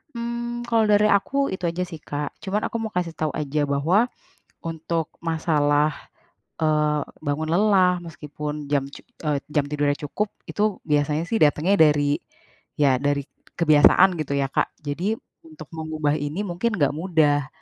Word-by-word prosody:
Mmm, 235 0 -4
kalau 225 -1 +3
dari 210 +1 +5
aku 200 +7 +1 0.2
itu 180 -2 -2
aja 170 +2 -1
sih 160 -3 -8
Kak. 145 0 -4 0.2
Cuman, 205 +2 -1
aku - - -4
mau - - -11
kasih 175 -2 -1
tahu 155 -1 0
aja 150 0 -2
bahwa 165 +11 +2 0.5
untuk 165 0 -3 0.2
masalah, 150 -2 +2 0.7
eee, 150 -1 +2 0.3
bangun 155 +2 -1
lelah, 190 -2 +4
meskipun 150 -2 -6 0.2
jam 140 -2 +2
cu - - -11 0.3
eee, 150 -2 +1 0.2
jam 145 -2 +3
tidurnya 145 -1 +1
cukup, 205 +9 -2 0.2
itu 210 - -2 0.3
biasanya 150 +2 +1
sih 225 - +1
datangnya 155 +6 +2
dari 145 -1 +1 0.6
ya, 135 -3 +4
dari 145 0 +1 0.4
kebiasaan, 160 +3 +6
gitu 145 -2 -3
ya, 140 - +1
Kak. - - +1 0.2
Jadi, 180 +10 -1 0.3
untuk 315 - -11
mengubah 155 -2 -1
ini 145 +5 -3
mungkin 180 +7 -1
nggak 145 -2 +2
mudah. 150 -6 +2
155 Hz, 155 wpm, -23 LUFS, 145-185 Hz, 0.7 s, kebiasaan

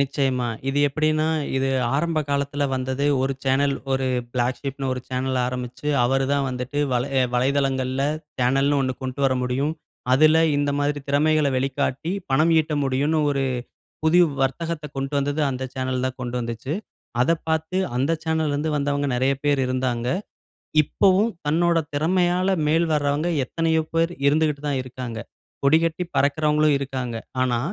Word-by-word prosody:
நிச்சயமா. 135 -3 0 0.2
இது 135 - 0
எப்பிடின்னா, 155 +2 +1 0.3
இது 135 0 +1 0.3
ஆரம்ப 165 +2 0
காலத்தில 140 0 -1
வந்தது. 130 +2 -2 0.2
ஒரு 135 +1 0
சேனல், 135 +1 +2 0.2
ஒரு 130 0 0 0.3
பிளாக் 125 0 0
ஷீப்னு 135 -1 -4
ஒரு 125 - -3
சேனல் 130 0 -1
ஆரம்பிச்சு, 125 +2 -5 0.2
அவரு 135 +2 +2
தான் 140 -1 +1
வந்துட்டு 125 +3 -4
வலை 125 +2 0
ஏ - - +4
வலைதளங்கள்ல 135 0 +1 0.4
சேனல்னு 135 +3 +2
ஒண்ணு 130 -1 0
கொண்ட்டு 130 +1 -4
வர 130 - +3
முடியும். 135 +5 0 0.4
அதில 155 +4 +6 0.2
இந்த 145 0 +1
மாதிரி 145 0 0
திறமைகள 150 +1 +3
வெளிக்காட்டி 135 +4 -1 0.2
பணம் 155 +5 +4
ஈட்ட 155 -1 0
முடியுன்னு 140 +4 +1
ஒரு 140 -1 0 0.6
புதுவ் 170 0 +5
வர்த்தகத்த 160 +3 -2
கொண்டு 135 +1 -3
வந்தது 145 +2 -1
அந்த 130 0 -4
சேனல் 130 -1 -2
தான் 130 0 -3
கொண்டு 125 -1 -3
வந்துச்சு. 115 +4 -4 0.5
அத 125 - +3 0.2
பார்த்து 160 +3 -1 0.2
அந்த 135 +6 +1
சேனல்ல 160 -2 0
இருந்து 150 +2 -1
வந்தவங்க 145 0 0
நிறைய 130 +2 +2
பேர் 145 -2 +2
இருந்தாங்க. 125 -2 -1 0.8
இப்பவும் 195 +8 +3 0.2
தன்னோட 170 +3 +2 0.2
திறமையால 180 +4 +2 0.2
மேல் 165 +2 +3
வர்றவங்க 145 +2 +1 0.2
எத்தனையோ 160 +3 0
பேர் 165 +1 +2 0.2
இருந்துக்கிட்டு 150 -1 +1
தான் 135 -2 0
இருக்காங்க. 125 -3 -6 0.4
கொடிகட்டி 165 +4 +3
பறக்கிறவர்களும் 150 +1 +3
இருக்காங்க. 130 -3 -4 0.3
ஆனா, 125 -2 +1
140 Hz, 145 wpm, -23 LUFS, 130-155 Hz, 0.8 s, அதில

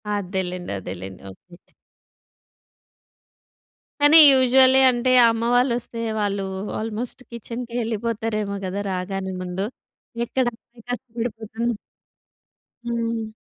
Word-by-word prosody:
అదేలెండి. 185 -2 -4
అదే‌లేండి. 95 +1 -8
ఓకే. 175 - -19 2.3
కానీ, 290 +2 +7
యూజువల్లీ 260 0 +5
అంటే, 255 +1 +1 0.2
అమ్మ 225 0 -1
వాళ్ళొస్తే, 245 -2 0 0.2
వాళ్ళూ 200 -1 -1 0.4
ఆల్‌మోస్ట్ 225 +3 -5
కిచెన్‌కేళ్ళిపోతారేమో 230 -3 -3
గదా 190 +2 -3
రాగానే 190 +1 -3
ముందు. 185 +2 -3 0.6
ఎక్కడమ్మాయి 240 -1 -4
కష్టపడిపోతుందో. 230 -2 -4 1.1
హ్మ్. 230 -1 -2
225 Hz, 75 wpm, -23 LUFS, 195-240 Hz, 2.3 s, కానీ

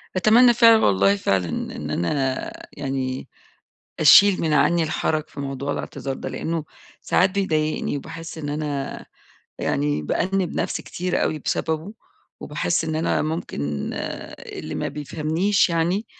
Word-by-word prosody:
أتمنى 230 +6 +6
فعلًا 230 -1 +6
والله 100 0 +4
فعلًا 95 -3 0
إن 75 +2 -3
أنا 135 - -1 0.2
يعني 135 -2 -3 0.7
أشيل 195 +5 +7
من 160 -2 +1
عني 170 +3 +3
الحرج 155 0 -1
في - - -10
موضوع 140 0 -3
الاعتذار 135 -1 -5
ده، - - -6
لأنه 165 -1 -3 0.4
ساعات 190 - +3
بيضايقني 155 -7 -1
وباحس 160 +3 -8
إن 145 -2 -4
أنا 145 -2 -4 0.5
يعني 75 +1 0
بأنِّبْ 185 - -1
نفْسي - - -2
كتير 180 0 -2
أوي 155 - 0
بسببه، 160 +5 -2 0.5
وباحس 150 +3 -1
إن 160 - -2
أنا 160 - +1
ممكن 160 +3 -4 0.8
اللي - - -7
ما - - -2
بيفهمنيش 160 +7 0
يعني 170 +6 0
155 Hz, 130 wpm, -23 LUFS, 135-175 Hz, 0.8 s, أشيل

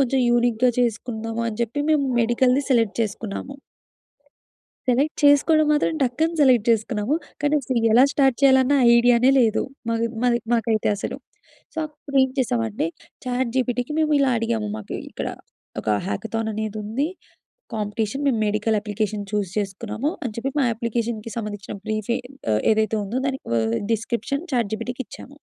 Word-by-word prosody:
కొంచెం 265 0 +2
యూనిక్‌గా 240 0 +3
చేసుకుందాము 225 -1 -2
అని 215 -1 -6
చెప్పి, 240 +5 -2
మేము 300 -3 +3 0.2
మెడికల్‌ది 250 +3 +2
సెలెక్ట్ 230 -6 +2
చేసుకున్నాము. 220 +5 -4 1.3
సెలెక్ట్ 275 +5 +2
చేసుకోవడం 300 +2 +5
మాత్రం 300 +2 +1
టక్కని 310 +7 0
సెలెక్ట్ 250 -5 +4
చేసుకున్నాము. 220 +3 0 0.3
కానీ, 290 +1 +2
అస్సల 255 -2 -1
ఎలా 245 +4 +7
స్టార్ట్ 270 -3 +3
చేయాలన్న 265 0 +5 0.2
ఐడియా‌నే 245 +1 +5
లేదు. 220 -3 +2 0.3
మాకు 230 0 +1 0.2
మది 245 -1 +3
మాకైతే 225 -2 +1
అసలు. - - -4 0.6
సో, 320 - -6
అప్పుడు 295 -2 -8
ఏం 265 - +1
చేసామంటే, 115 - 0 0.4
చాట్‌జీపీటీ‌కి 250 +2 -1
మేము 310 -1 +2
ఇలా 275 -1 +3
అడిగాము. 225 -2 -1
మాకు 215 - -7 0.2
ఇక్కడ - - -4 0.5
ఒక - - -5 0.2
హ్యాకథాననేది 220 - -3
ఉంది. 250 +9 -1 0.7
కాంపిటీషన్ 215 +5 -2
మేము 245 -5 +2
మెడికల్ 215 +1 +1
అప్లికేషన్ 210 0 -3
చూజ్ 205 -3 -1
చేసుకున్నాము. 215 +7 -2
అని 240 -4 -3
చెప్పి 265 +4 -2
మా 275 - +3
అప్లికేషన్‌కి 230 -1 -3
సంబంధించిన 210 -3 -5
బ్రీఫె 215 +2 -1 0.4
ఆహ్, 105 - +1
ఏదైతే 220 0 +1
ఉందో 220 +6 -2
దానికి 265 -1 -4
ఆహ్, 110 +1 0 0.2
డిస్క్రిప్షన్ 235 +6 -2
చాట్‌జీపీటీ‌కి 240 +2 -2
ఇచ్చాము. 280 +2 -12
235 Hz, 140 wpm, -23 LUFS, 215-265 Hz, 1.3 s, ఎలా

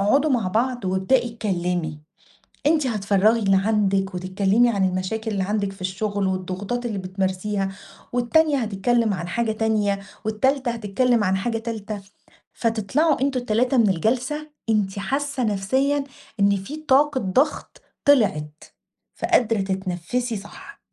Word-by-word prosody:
اقعدوا 275 +10 +3
مع 230 -7 +1
بعض 245 +3 0
وابدئي 230 +6 +1
اتكلمي، 175 -7 -2 0.7
أنتِ 300 -3 +3
هتفرغي 210 0 +2
اللي 195 -2 +3
عندِك 195 -2 +1
وتتكلمي 195 +6 +2
عن 195 -3 +2
المشاكل 200 +5 -3
اللي 195 -2 -1
عندِك 200 0 -1
في 195 - -16
الشغل 200 +1 -1
والضغوطات 190 +6 -3
اللي 210 -4 -3
بتمارسيها 190 +1 -2 0.4
والتانية 280 +5 +3
هتتكلم 220 0 +1
عن 175 -1 -5
حاجة 225 +3 0
تانية 215 -2 0 0.2
والتالتة 255 +4 +1
هتتكلم 230 +1 +1
عن 190 +1 +2
حاجة 225 +3 -1
تالتة، 220 -2 -5 0.5
فتطلعوا 230 +7 +1
أنتم 270 -2 +1
ال3 245 +3 +1
من 225 - +5
الجلسة، 255 - -1 0.2
أنتِ 200 -2 0
حاسة 275 +4 -1
نفسيًا 265 +8 +1 0.4
إن 200 0 +4
في 195 +11 -6
طاقة 295 -2 +3
ضغط 255 +11 0 0.2
طلعِت. 160 - +2 0.5
فقادرة 225 -3 +2
تتنفسي 190 +5 -2
صح. 200 +1 -11
215 Hz, 130 wpm, -23 LUFS, 195-245 Hz, 0.7 s, من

